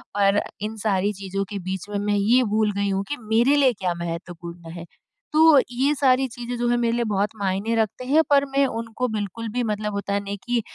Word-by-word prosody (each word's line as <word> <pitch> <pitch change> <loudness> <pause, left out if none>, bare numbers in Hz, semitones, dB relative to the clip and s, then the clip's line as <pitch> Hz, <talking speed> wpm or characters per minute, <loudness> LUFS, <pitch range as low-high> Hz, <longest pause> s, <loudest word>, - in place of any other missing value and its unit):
और 200 0 +3 0.2
इन 215 +1 -3
सारी 200 +1 +1
चीज़ों 195 +1 -2
के 200 -1 -4
बीच 190 +2 -4
में 205 - -2
मैं 205 0 +1
ये 235 +6 +4
भूल 215 -1 +2
गई 200 0 0
हूँ 195 0 0
कि 290 - -2
मेरे 235 +6 +4
लिए 270 -3 +4
क्या 185 -4 -2
महत्वपूर्ण 170 0 -7
हैं? 170 0 -8 0.5
तो 315 -2 +7
ये 270 +4 +1
सारी 265 -1 +3
चीज़ें 245 0 -5
जो 240 0 0
हैं 240 - +2
मेरे 235 -1 +1
लिए 240 - +1
बहुत 205 -1 0
मायने 195 +3 -1
रखते 225 +3 -1
हैं 300 +5 +4
पर 280 -1 +4
मैं 275 0 +4
उनको 230 +1 -3
बिल्कुल 215 +2 -4
भी 245 - +1
मतलब 210 0 -3
होता 200 0 -1
नहीं 200 0 -5
कि 240 -1 +1
215 Hz, 220 wpm, -23 LUFS, 195-245 Hz, 0.5 s, तो